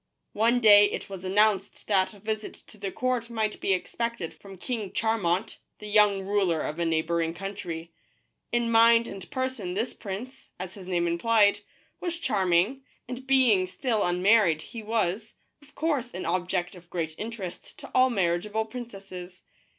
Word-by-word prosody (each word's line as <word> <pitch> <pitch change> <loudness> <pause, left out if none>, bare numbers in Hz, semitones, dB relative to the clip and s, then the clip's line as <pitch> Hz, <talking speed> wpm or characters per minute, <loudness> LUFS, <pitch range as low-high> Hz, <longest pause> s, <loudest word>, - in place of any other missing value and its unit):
One 230 +3 +3
day 205 -3 +8
it - - -5
was 190 -2 -7
announced 200 +1 +1
that 195 -1 +1
a - - -15
visit 215 +1 -4
to 210 - -14
the 195 -1 -3
court 250 0 -1
might 220 -2 -2
be - - 0
expected 230 0 -2
from 195 -1 -13
King 215 0 -4
Charmant, 210 -2 0 0.2
the 210 - -11
young 205 -2 +4
ruler 190 -5 +1
of 155 +3 -4
a 170 - +1
neighboring 165 +1 0
country. 170 -3 -6 0.6
In 235 -1 +1
mind 230 0 +6
and 195 -2 -8
person 260 -9 -3
this 230 +4 -1
prince, 220 +5 -8
as 185 0 -6
his 185 -2 -11
name 175 -2 +1
implied, 205 +4 +3 0.4
was 345 -2 -3
charming, 205 - +1 0.3
and 255 +1 -7
being 245 -9 +4
still 220 +3 -1
unmarried 180 -2 +3
he 230 - -8
was, 215 -1 -1 0.3
of 290 - -21
course, 285 -6 -1
an 185 - -4
object 175 0 -1
of 175 -2 -15
great 165 -3 -3
interest 215 -5 -7
to - - -11
all 255 0 +5
marriage* 175 -4 0
able 220 +1 -1
princesses. 195 -6 -9
205 Hz, 165 wpm, -27 LUFS, 180-230 Hz, 0.6 s, day